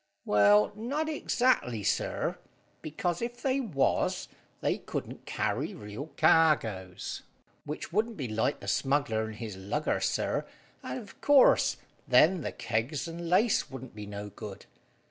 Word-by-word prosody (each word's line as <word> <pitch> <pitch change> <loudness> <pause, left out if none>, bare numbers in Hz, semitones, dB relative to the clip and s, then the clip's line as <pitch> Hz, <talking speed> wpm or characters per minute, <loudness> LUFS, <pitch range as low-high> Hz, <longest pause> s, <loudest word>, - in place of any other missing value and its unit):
"Well, 105 0 +5
not 275 +9 -2
exactly, 245 - +1
sir, - - -1 0.4
because 170 +4 -2
if 240 +1 -4
they 270 0 +1
was, 180 - 0 0.3
they - - 0
couldn't - - -6
carry - - -1
real 105 +7 -7
cargoes, 110 - +2 0.4
which 150 +3 -6
wouldn't 220 +3 0
be 135 -5 -3
like 110 +6 -1
the - - -9
smuggler 135 -6 +1
and 110 0 -7
his 110 -3 -6
lugger, 105 +12 -1
sir, - - -1 0.3
and, - - -5
of 220 -5 -11
course, 285 -3 +5 0.3
then 175 +2 +5
the - - -3
kegs 120 +8 -2
and 170 0 -6
lace 205 +5 +3
wouldn't 130 -1 -9
be 105 -1 -8
no 105 0 -6
good. 105 -2 -9
140 Hz, 140 wpm, -29 LUFS, -, 0.4 s, Well